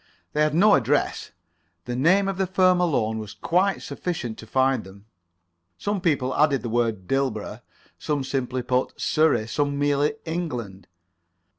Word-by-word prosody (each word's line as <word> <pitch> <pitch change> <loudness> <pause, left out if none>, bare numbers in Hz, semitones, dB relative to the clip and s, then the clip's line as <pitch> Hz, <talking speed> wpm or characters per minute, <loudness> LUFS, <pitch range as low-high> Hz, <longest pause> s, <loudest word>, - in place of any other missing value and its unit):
They 150 - +1
had 150 0 +2
no 205 +5 +6
address. - - +1 0.6
The 120 - -4
name 185 +9 +3
of 195 -1 -3
the 190 - +1
firm 185 -1 +3
alone 110 -10 0
was 105 -2 -8
quite 190 +3 +1
sufficient 125 -11 -4
to 110 - -10
find 130 +2 +1
them. 100 +2 -14 0.7
Some 205 -2 -2
people 135 -7 0
added 145 -3 +2
the 120 - -3
word 110 -5 -1
Dilborough; 135 -6 -2 0.4
some 145 -3 -1
simply 130 -2 -2
put 125 +1 -1
Surrey; 155 -8 +2
some 145 +3 -1
merely 145 +4 +1
England. 125 - -5
140 Hz, 150 wpm, -24 LUFS, 120-170 Hz, 0.7 s, no